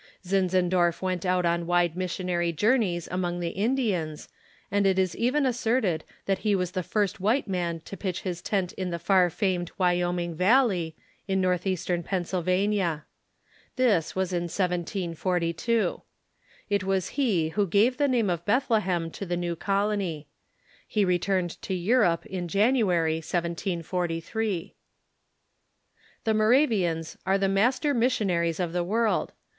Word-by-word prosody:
Zinzendorf 185 -2 +1
went 185 -1 -1
out 180 -1 +2
on 170 0 0
wide 175 -1 +2
missionary 180 -1 -1
journeys 195 - +1
among 175 -1 -2
the 170 -1 -2
Indians, 200 - -1 0.4
and 200 0 +2
it 190 -1 +2
is 185 -1 +1
even 265 +5 +1
asserted 225 -9 0 0.2
that 195 -1 0
he 210 -2 +1
was 180 -2 -1
the 185 - -2
first 205 +3 -1
white 220 +8 +1
man 175 -3 -2
to 195 - -9
pitch 190 -3 -3
his 175 -3 -4
tent 190 -4 -1
in 185 -1 -3
the 170 - -2
far 185 0 +3
famed 180 -1 -1
Wyoming 175 -1 +1
Valley, 185 - +2 0.3
in 190 -1 +1
northeastern 180 -1 0
Pennsylva 185 +1 0
nia. 175 -7 -1 0.7
This 225 -11 +2
was 190 -1 -1
in 175 0 0
1742. 180 +3 -1 0.7
It 200 -2 0
was 190 -2 0
he 205 - +1
who 200 +4 0
gave 210 +8 +3
the 290 -1 +2
name 235 -7 +1
of 170 -1 -3
Bethlehem 205 -7 +1
to - - -7
the 175 0 -1
new 175 -1 -2
colony. 195 -5 -1 0.6
He 210 -2 +1
returned 180 0 0
to 190 - -4
Euroj^e 180 -2 +2
in 180 -2 -4
Jan 205 +8 +3
uary, 175 -10 +2
1743. 170 +3 -2 1.5
The 220 - +1
Moravians 215 - +2
are 190 +1 +2
the 195 0 +1
master 245 +9 +2
missionaries 190 - +1
of 175 -2 -2
the 175 -1 0
world. 220 +5 0
185 Hz, 140 wpm, -27 LUFS, 175-205 Hz, 1.5 s, far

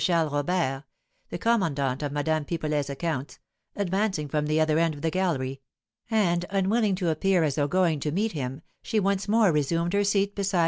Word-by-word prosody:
Charles 165 -5 +2
Robert 145 -2 0 0.5
(the - - -4
commandant 155 - 0
of 145 -2 -2
Madame 155 +1 0
Pipelet's 150 -2 -2
accounts) 140 -1 -3 0.4
advancing 195 -4 -1
from 150 +1 -1
the 155 +1 +1
other 155 0 +3
end 165 -2 +1
of 145 - -11
the 160 - +1
gallery; 135 -8 -1 0.5
and, 180 -6 +2
unwilling 200 +1 +1
to 180 -2 -1
appear 175 +2 +2
as 150 -3 +1
though 145 0 0
going 170 -2 +2
to 150 +1 -2
meet 210 +7 0
him, 135 0 -5 0.2
she 225 - 0
once 200 0 0
more 215 -2 +4
resumed 165 +4 0
her 205 0 +3
seat 200 0 +1
beside 195 -2 -1
M. - - +3
165 Hz, 190 wpm, -26 LUFS, 145-195 Hz, 0.5 s, more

